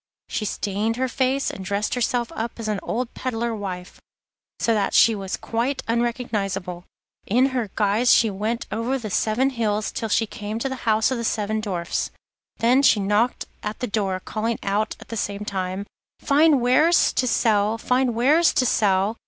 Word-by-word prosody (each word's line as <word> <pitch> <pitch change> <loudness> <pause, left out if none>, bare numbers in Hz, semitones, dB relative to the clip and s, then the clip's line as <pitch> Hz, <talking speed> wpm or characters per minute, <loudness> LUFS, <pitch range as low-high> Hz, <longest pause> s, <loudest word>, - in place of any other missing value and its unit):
She 215 - -2
stained 210 +2 -1
her 260 +2 0
face 265 +2 0
and 190 - -8
dressed 200 +2 -1
herself 245 -1 0
up 225 +1 -4
as 225 - -4
an 210 -2 -1
old 245 +1 -3
peddler 235 -2 -2
wife, 185 -4 -6 0.6
so 230 - +2
that 205 -3 0
she 230 - +6
was 195 -2 -4
quite 240 +5 -2
unrecognisable. 210 -7 -2 0.4
In 255 +5 +2
this 240 -5 -1
guise 215 +4 +3
she 225 -2 +5
went 215 +4 -2
over 235 +5 -1
the 220 -5 -6
seven 245 +8 +1
hills 215 -4 -1
till 225 - -4
she 225 - +2
came 215 0 -6
to 270 +4 -2
the 255 -3 -3
house 220 +3 +3
of 255 - -1
the - - -3
seven 215 -1 -1
Dwarfs. 180 -5 -2 0.5
There 245 +4 +4
she 250 -6 +5
knocked 210 +5 +1 0.2
at 210 0 -4
the 250 - -3
door, 200 -4 -1
calling 225 +4 -2
out 205 +2 0
at - - -14
the 230 - -4
same 205 0 -3
time: 190 0 -3 0.3
'Fine 290 -1 +4
wares 305 +8 +4
to 255 - +1
sell, 215 -2 +2
fine 250 +1 +1
wares 300 +8 +4
to 260 - +3
sell! 205 -1 +2
225 Hz, 180 wpm, -23 LUFS, 205-245 Hz, 0.6 s, she